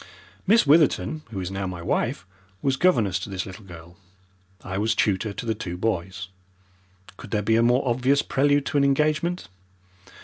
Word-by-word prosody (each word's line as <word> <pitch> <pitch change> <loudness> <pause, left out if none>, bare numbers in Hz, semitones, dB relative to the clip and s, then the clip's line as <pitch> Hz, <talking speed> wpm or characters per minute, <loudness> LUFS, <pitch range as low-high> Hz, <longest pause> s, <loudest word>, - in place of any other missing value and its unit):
Miss 220 +1 +5
Witherton, 155 +1 +3
who 105 -4 -5
is 90 0 -4
now 95 0 -3
my 90 -2 -6
wife, 85 +1 -1 0.4
was 135 -1 +2
governess 115 - +2
to 100 - -7
this 95 -2 -4
little 95 +2 -10
girl. 85 -1 -13 0.7
I 95 0 -4
was 110 +2 +1
tutor 105 +1 0
to 110 - -7
the 110 - 0
two 95 -6 -6
boys. 95 -2 -3 0.9
Could - - -11
there 105 0 -1
be 110 +2 +2
a 115 - +4
more 125 +3 +2
obvious 130 +4 +2
prelude 145 +1 +2
to - - -1
an 140 - +4
engagement? 155 - +1
110 Hz, 175 wpm, -24 LUFS, 95-140 Hz, 0.9 s, Miss